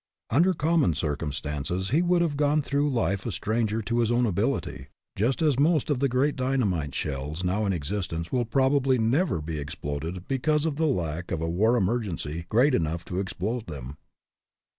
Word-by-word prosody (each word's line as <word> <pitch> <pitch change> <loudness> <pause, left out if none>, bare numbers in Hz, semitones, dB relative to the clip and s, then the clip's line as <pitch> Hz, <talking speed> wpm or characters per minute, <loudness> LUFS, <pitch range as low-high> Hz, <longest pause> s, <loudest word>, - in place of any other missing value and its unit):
Under 175 +9 +4
common 155 - +2
circumstances 75 +4 -2
he 155 +5 +4
would 175 0 +3
have 155 -4 -1
gone 145 +1 +2
through 145 +1 +1
life 100 - 0
a - - -1
stranger 110 +3 -1
to 115 +3 0
his 115 -1 +2
own 120 +1 +3
ability, 70 - -1 0.3
just 125 - +1
as 145 -4 +2
most 155 0 +3
of 140 - +1
the 140 0 +2
great 130 +4 +1
dynamite 105 - 0
shells 75 +4 -3
now 100 +4 0
in - - +1
existence 85 0 -3
will 125 -2 +1
probably 130 +2 +2
never 120 - +1
be 80 0 -4
exploded 75 +5 -5
because 150 +3 +1
of 155 -3 -1
the 160 0 +2
lack 85 - -2
of 85 - -1
a 80 - -2
war 110 +9 +2
emergency 90 -7 -2
great 130 +6 +4
enough 85 -3 -1
to 90 - -3
explode 105 +5 -3
them. 70 -3 -7
110 Hz, 180 wpm, -26 LUFS, 85-135 Hz, 0.3 s, Under